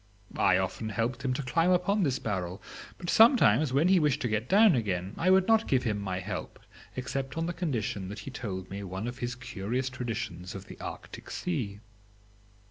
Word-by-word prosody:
I 90 - +5
often 95 +4 -2
helped 115 +5 -2
him 135 - 0
to 140 - -3
climb 165 +7 +2
upon 185 +3 +2
this 135 -7 +1
barrel; 95 -3 -3 0.4
but 175 - -8
sometimes, 155 - +5
when 140 +6 +3
he 190 -1 +5
wished 150 -4 +2
to - - +1
get 110 +2 -2
down 210 0 +6
again, 95 -6 -1
I 180 - +1
would 190 0 +5
not 225 0 +4
give 130 -2 +2
him 105 -4 -1
my 95 -2 -3
help 100 +2 -6 0.4
except 135 +2 -4
on 165 - 0
the 175 - -2
condition 115 - -2
that 105 - -7
he 135 - -6
told 95 -8 -5
me 100 +1 -5
one 95 +4 -4
of 120 +1 -6
his 120 0 -3
curious 125 +1 -3
traditions 115 -7 -5
of 95 0 -7
the - - -12
Arctic - - -8
Sea. 115 - -3
125 Hz, 200 wpm, -29 LUFS, 100-160 Hz, 0.4 s, down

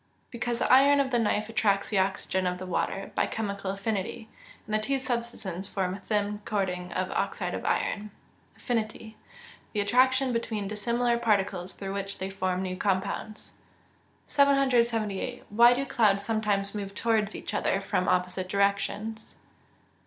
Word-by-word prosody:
_ - - -40 0.3
Because 240 -1 -2
the - - +3
iron 280 +2 +7
of 270 -1 +1
the 240 - +2
knife 215 -1 +1
attracts 205 -3 +1
the 210 - +2
oxygen 190 -1 0
of 180 0 -1
the 185 - -6
water, 195 +2 -2
by - - +1
chemical 200 -3 -3
affinity; 200 +2 -3 0.4
and 215 - -6
the 215 - +3
two 270 +6 0
substances 235 -7 -4
form 185 -2 -1
a 195 - -6
thin 205 0 -1
coating 180 -4 -2
of 185 0 -1
oxide - - -2
of - - -4
iron. 210 +1 0 0.5
Affinity. 220 -2 -3 0.6
Attraction 255 +5 +3
between 220 -3 -2
dissimilar 235 +3 0
particles 195 -5 0
through 195 -1 -5
which 200 0 -4
they 190 +1 -4
form 185 -1 -1
new 185 -1 -3
compounds. 200 +3 -2 0.7
778. 245 -5 +2
_Why 240 +2 +7
do 275 +2 -1
clouds 205 -6 +2
sometimes 205 -2 0
move 200 -2 -5
towards 220 -2 +1
each - - -6
other 195 - +1
from 195 -2 -1
opposite 180 +1 0
directions? 200 +2 -1
210 Hz, 150 wpm, -28 LUFS, 195-235 Hz, 0.7 s, iron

